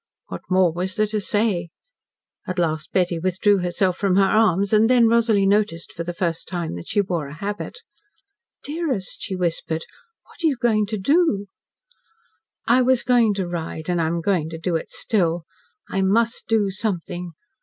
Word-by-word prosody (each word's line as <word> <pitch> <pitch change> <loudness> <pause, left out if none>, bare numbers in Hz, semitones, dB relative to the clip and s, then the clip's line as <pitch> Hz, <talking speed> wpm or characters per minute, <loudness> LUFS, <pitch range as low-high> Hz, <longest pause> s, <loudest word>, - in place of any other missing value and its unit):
What 90 - -6
more 185 -3 +3
was 185 +2 -3
there 215 - +2
to 210 0 -2
say? 200 -5 0 0.8
At 185 - -4
last 160 -3 -1
Betty 180 -2 +1
withdrew 185 +3 +2
herself 180 +1 0
from 195 -2 +1
her 195 - +5
arms, 200 -1 +2
and 215 +2 +5
then 245 -2 +5
Rosalie 225 -3 +3
noticed 195 -4 +1
for 170 - -4
the 175 - -4
first 170 -1 -2
time 175 -3 -3
that 85 0 -8
she 205 - +2
wore 175 -6 -3
the 140 - -9
habit. 205 - -5 0.9
"Dearest," 290 - -3
she 190 - -4
whispered, 165 -2 -2 0.4
"what - - -15
are - - +5
you 280 -5 +1
going 220 -4 +2
to 215 0 -3
do?" 250 - +2 1.2
"I 245 +2 +4
was 255 -1 +3
going 235 -4 +3
to 190 -3 -2
ride, 165 -1 -5
and 175 -1 +1
I 160 - +1
am 170 +1 -1
going 170 -3 0
to 160 - -6
do 165 +1 -2
it 160 - -3
still. 175 -6 0 0.4
I 195 - -1
must 225 +5 +1
do 215 -3 +2
something. 180 -3 -4
190 Hz, 180 wpm, -22 LUFS, 170-215 Hz, 1.2 s, her